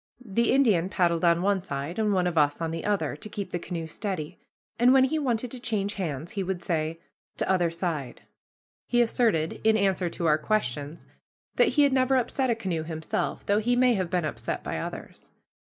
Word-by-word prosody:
The 230 Hz, +3 st, +1 dB
Indian 210 Hz, -10 st, +3 dB
paddled 170 Hz, -4 st, +1 dB
on 170 Hz, 0 st, +3 dB
one 200 Hz, -1 st, +2 dB
side, 145 Hz, +2 st, -5 dB
and 215 Hz, -1 st, +2 dB
one 185 Hz, -2 st, +2 dB
of 175 Hz, -1 st, -1 dB
us 145 Hz, -2 st, +2 dB
on 165 Hz, -1 st, -2 dB
the 165 Hz, 0 st, -4 dB
other, 195 Hz, -9 st, 0 dB
to 180 Hz, +8 st, -8 dB
keep 200 Hz, -3 st, -5 dB
the 175 Hz, -, -2 dB
canoe 170 Hz, -1 st, -5 dB
steady, 160 Hz, -2 st, -5 dB, 0.4 s
and 245 Hz, +2 st, +6 dB
when 265 Hz, -1 st, +6 dB
he 310 Hz, +4 st, +1 dB
wanted 245 Hz, -4 st, -1 dB
to 255 Hz, -, -6 dB
change 210 Hz, -4 st, -1 dB
hands 160 Hz, -5 st, -4 dB
he 200 Hz, -, -3 dB
would 185 Hz, -2 st, -3 dB
say, 160 Hz, -1 st, -1 dB, 0.4 s
"T' -, -, 0 dB
other 180 Hz, -3 st, +2 dB
side." 165 Hz, -7 st, -4 dB, 0.6 s
He 240 Hz, -, +2 dB
asserted, 225 Hz, -9 st, +1 dB
in 220 Hz, 0 st, +4 dB
answer 190 Hz, -3 st, +1 dB
to 170 Hz, -, -4 dB
our 155 Hz, -1 st, +4 dB
questions, 150 Hz, -, -2 dB, 0.5 s
that -, -, +5 dB
he 295 Hz, -, +7 dB
had 280 Hz, -2 st, +3 dB
never 260 Hz, 0 st, +3 dB
upset 260 Hz, +1 st, 0 dB
a 235 Hz, -, +2 dB
canoe 185 Hz, -7 st, -2 dB
himself, 160 Hz, 0 st, -3 dB
though 205 Hz, +1 st, +2 dB
he 240 Hz, +3 st, +1 dB
may 250 Hz, 0 st, +4 dB
have 185 Hz, -5 st, -1 dB
been 175 Hz, -2 st, 0 dB
upset 155 Hz, -, -4 dB
by -, -, -3 dB
others. -, -, -8 dB
185 Hz, 205 wpm, -27 LUFS, 165-225 Hz, 0.6 s, he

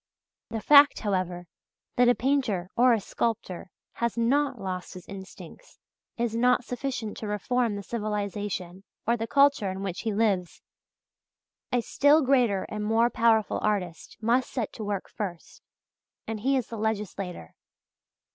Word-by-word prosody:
The 225 Hz, -1 st, -4 dB
fact, 285 Hz, +3 st, +7 dB
however, 185 Hz, -4 st, -2 dB, 0.5 s
that 245 Hz, 0 st, +5 dB
a 245 Hz, -, +4 dB
painter 225 Hz, -8 st, 0 dB
or 250 Hz, +1 st, +5 dB
a 230 Hz, -, +3 dB
sculptor 195 Hz, -3 st, -3 dB, 0.2 s
has 235 Hz, 0 st, -2 dB
not 275 Hz, +5 st, +1 dB
lost 185 Hz, -2 st, -5 dB
his 180 Hz, -, -10 dB
instincts 195 Hz, -1 st, -11 dB, 0.4 s
is 235 Hz, -1 st, -1 dB
not 250 Hz, +1 st, +3 dB
sufficient 245 Hz, -4 st, -4 dB
to 215 Hz, -, -5 dB
reform 220 Hz, +2 st, 0 dB
the 200 Hz, -, -6 dB
civilization 205 Hz, -4 st, -4 dB, 0.2 s
or 235 Hz, -, +2 dB
the 225 Hz, -1 st, -4 dB
culture 280 Hz, -6 st, +3 dB
in 190 Hz, +1 st, -5 dB
which 190 Hz, -3 st, -4 dB
he 225 Hz, -, -1 dB
lives. 200 Hz, -5 st, 0 dB, 1.1 s
A 245 Hz, -, +2 dB
still 290 Hz, +6 st, +4 dB
greater 245 Hz, -8 st, +3 dB
and 210 Hz, 0 st, -4 dB
more 225 Hz, +3 st, +2 dB
powerful 225 Hz, -2 st, +2 dB
artist 190 Hz, -6 st, -2 dB
must 240 Hz, +3 st, +1 dB
set 235 Hz, -5 st, -3 dB
to 220 Hz, -, -6 dB
work 205 Hz, -2 st, -3 dB
first, 180 Hz, -6 st, -7 dB, 0.6 s
and 225 Hz, -1 st, -4 dB
he 270 Hz, +5 st, +2 dB
is 250 Hz, -, -1 dB
the 230 Hz, -, -7 dB
legislator. 200 Hz, -, -3 dB
220 Hz, 145 wpm, -27 LUFS, 195-245 Hz, 1.1 s, fact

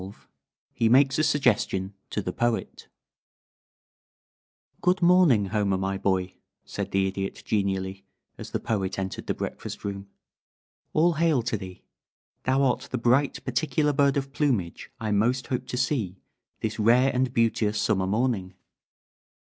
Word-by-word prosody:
XII 95 Hz, +2 st, -8 dB, 0.6 s
HE 115 Hz, -, +2 dB
MAKES 135 Hz, +3 st, +4 dB
A -, -, +3 dB
SUGGESTION 105 Hz, -9 st, +1 dB, 0.2 s
TO 105 Hz, -, -3 dB
THE 90 Hz, -, -3 dB
POET 120 Hz, -1 st, -2 dB, 1.9 s
"Good 180 Hz, 0 st, +2 dB
morning, 170 Hz, -, +5 dB
Homer, 100 Hz, -3 st, +1 dB
my 95 Hz, +1 st, -2 dB
boy," 95 Hz, -1 st, 0 dB, 0.3 s
said -, -, -4 dB
the 95 Hz, 0 st, +1 dB
Idiot, 95 Hz, 0 st, -4 dB
genially, 95 Hz, -2 st, -1 dB, 0.3 s
as -, -, -9 dB
the -, -, -2 dB
Poet 95 Hz, -4 st, -2 dB
entered 95 Hz, -1 st, -4 dB
the -, -, -1 dB
breakfast -, -, -6 dB
room. 100 Hz, -1 st, -5 dB, 0.9 s
"All 170 Hz, +3 st, +4 dB
hail 155 Hz, -6 st, +2 dB
to 115 Hz, -1 st, -1 dB
thee. 95 Hz, -3 st, -8 dB, 0.6 s
Thou 135 Hz, +2 st, +2 dB
art 125 Hz, -2 st, 0 dB
the 130 Hz, -, -2 dB
bright 125 Hz, +4 st, +1 dB
particular 150 Hz, +3 st, +1 dB
bird 140 Hz, 0 st, +3 dB
of 135 Hz, 0 st, -3 dB
plumage 120 Hz, -, -1 dB
I 110 Hz, -2 st, -2 dB
most 120 Hz, +5 st, +1 dB
hoped 125 Hz, -1 st, -3 dB
to 125 Hz, -, -4 dB
see 120 Hz, -8 st, -1 dB, 0.4 s
this 110 Hz, 0 st, -3 dB
rare 120 Hz, +5 st, +4 dB
and 125 Hz, 0 st, +1 dB
beauteous 110 Hz, -3 st, +1 dB
summer 95 Hz, -4 st, +1 dB
morning. 105 Hz, -3 st, -1 dB
115 Hz, 145 wpm, -26 LUFS, 95-135 Hz, 1.9 s, morning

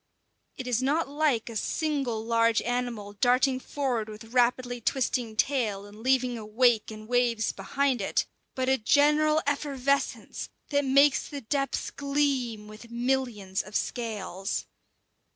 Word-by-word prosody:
It 260 Hz, -, -5 dB
is 250 Hz, -1 st, 0 dB
not 290 Hz, +5 st, +1 dB
like 285 Hz, -5 st, +1 dB
a 230 Hz, -, -7 dB
single 260 Hz, -3 st, -1 dB
large 230 Hz, -1 st, +3 dB
animal 240 Hz, -4 st, -3 dB
darting 255 Hz, +4 st, +3 dB
forward 255 Hz, -6 st, -2 dB
with 215 Hz, +2 st, -11 dB
rapidly 245 Hz, 0 st, +2 dB
twisting 240 Hz, -2 st, -1 dB
tail, 215 Hz, -5 st, 0 dB
and 205 Hz, +1 st, -13 dB
leaving 255 Hz, -1 st, +1 dB
a -, -, -7 dB
wake 225 Hz, +1 st, +2 dB
and 215 Hz, 0 st, -9 dB
waves 240 Hz, -2 st, +1 dB
behind 255 Hz, +5 st, -1 dB
it; 195 Hz, -, 0 dB, 0.3 s
but 260 Hz, -1 st, -1 dB
a 265 Hz, 0 st, +3 dB
general 300 Hz, +5 st, +4 dB
effervescence 280 Hz, -1 st, -1 dB, 0.2 s
that 285 Hz, -1 st, +1 dB
makes 275 Hz, +1 st, +4 dB
the 285 Hz, -2 st, -6 dB
depths 275 Hz, +3 st, -2 dB
gleam 275 Hz, -6 st, -1 dB
with 215 Hz, +2 st, -12 dB
millions 235 Hz, -6 st, -1 dB
of 210 Hz, +1 st, -12 dB
scales. 205 Hz, -5 st, -3 dB
245 Hz, 135 wpm, -28 LUFS, 220-275 Hz, 0.3 s, general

